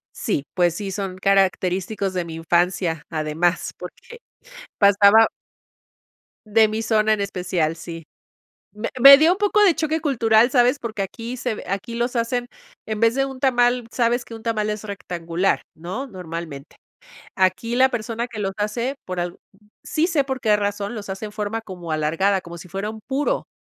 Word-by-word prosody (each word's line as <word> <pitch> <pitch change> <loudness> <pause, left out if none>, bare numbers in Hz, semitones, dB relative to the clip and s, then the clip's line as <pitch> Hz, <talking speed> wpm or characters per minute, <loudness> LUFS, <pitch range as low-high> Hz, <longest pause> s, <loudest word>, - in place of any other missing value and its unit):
Sí, 140 - -2
pues 175 -2 +2
sí, 200 -1 -4
son 190 -2 -4
característicos 190 0 +1
de 180 -2 -2
mi 165 -1 -7
infancia, 170 -1 0
además, 160 +2 -1
porque 470 - -11 0.6
pasaba 200 +2 +6 1.2
De 220 +1 +4
mi 215 +1 -3
zona 220 -1 +2
en 205 - -1
especial, 180 -4 -1
sí. 165 -1 -9 0.7
Me 210 +2 -5
me 275 +2 +11
dio 320 +3 +5
un 375 - 0
poco 420 0 +3
de 370 -4 +6
choque 315 +1 -1
cultural, 235 -5 +3
¿sabes? 245 +1 +4
Porque 225 -5 -5
aquí 230 +5 -5
se 240 -2 -2
ve - - -8
aquí 200 +4 -4
los 240 +2 -2
hacen, 245 +1 -1 0.4
en 215 -1 -4
vez 230 +1 +3
de 270 0 +2
un 265 -1 -8
tamal, 245 -2 +2
sabes 240 0 +1
que 230 - -10
un 225 - -11
tamal 215 -2 -1
es 210 0 -4
rectangular, 180 -3 -2
¿no? 185 - -6
Normalmente. 165 - -8 0.6
Aquí 190 +5 +1
la 260 +2 +5
persona 235 0 -3
que 225 -3 -9
los 195 -2 -2
hace 235 +6 -2
por 185 -1 -5
al 175 0 -3 0.5
sí 315 +2 0
sé 330 -5 +1
por 265 -1 -4
qué 215 -3 +3
razón, 205 +1 -3
los 205 -2 -7
hace 190 +2 -5
en 210 - -7
forma 210 +1 -3
como 180 -5 -9
alargada, 165 +6 +1
como 170 -1 -10
si 180 - -11
fuera 195 +4 -4
un 220 0 -9
puro. 275 +2 -1
210 Hz, 180 wpm, -22 LUFS, 185-240 Hz, 1.2 s, me